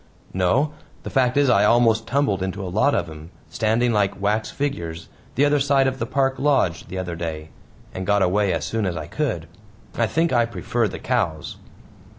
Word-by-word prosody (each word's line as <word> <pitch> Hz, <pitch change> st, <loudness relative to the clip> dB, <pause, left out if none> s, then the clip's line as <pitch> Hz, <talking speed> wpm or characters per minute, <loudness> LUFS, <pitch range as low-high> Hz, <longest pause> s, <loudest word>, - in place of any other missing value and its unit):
"No. 115 Hz, +12 st, +1 dB, 0.3 s
The -, -, -6 dB
fact 130 Hz, -1 st, +2 dB
is 145 Hz, -1 st, +4 dB
I 100 Hz, -5 st, +4 dB
almost 115 Hz, 0 st, +3 dB
tumbled 120 Hz, -8 st, +1 dB
into 95 Hz, +1 st, -3 dB
a 90 Hz, -, -6 dB
lot 140 Hz, +8 st, +3 dB
of -, -, -1 dB
'em 80 Hz, 0 st, -10 dB, 0.2 s
standing 115 Hz, +2 st, +1 dB
like 100 Hz, -2 st, 0 dB
wax 105 Hz, +2 st, 0 dB
figures 85 Hz, -, -4 dB, 0.3 s
the 140 Hz, -, +4 dB
other 145 Hz, 0 st, +3 dB
side 135 Hz, -1 st, +3 dB
of 130 Hz, 0 st, -1 dB
the 115 Hz, -, -2 dB
park 135 Hz, +1 st, 0 dB
lodge, 135 Hz, -, +1 dB
the 95 Hz, -, -6 dB
other 90 Hz, -2 st, -4 dB
day 80 Hz, -2 st, -5 dB, 0.4 s
and 95 Hz, -, -4 dB
got 100 Hz, -1 st, +3 dB
away 100 Hz, +2 st, +2 dB
as 80 Hz, -3 st, -2 dB
soon 110 Hz, -3 st, -1 dB
as 85 Hz, -2 st, -3 dB
I -, -, -5 dB
could. 110 Hz, -, -3 dB, 0.5 s
I 115 Hz, -, +1 dB
think 165 Hz, +6 st, 0 dB
I 120 Hz, -1 st, +3 dB
prefer 120 Hz, -1 st, -1 dB
the -, -, -6 dB
cows." 100 Hz, -12 st, -2 dB
110 Hz, 195 wpm, -22 LUFS, 90-130 Hz, 0.5 s, is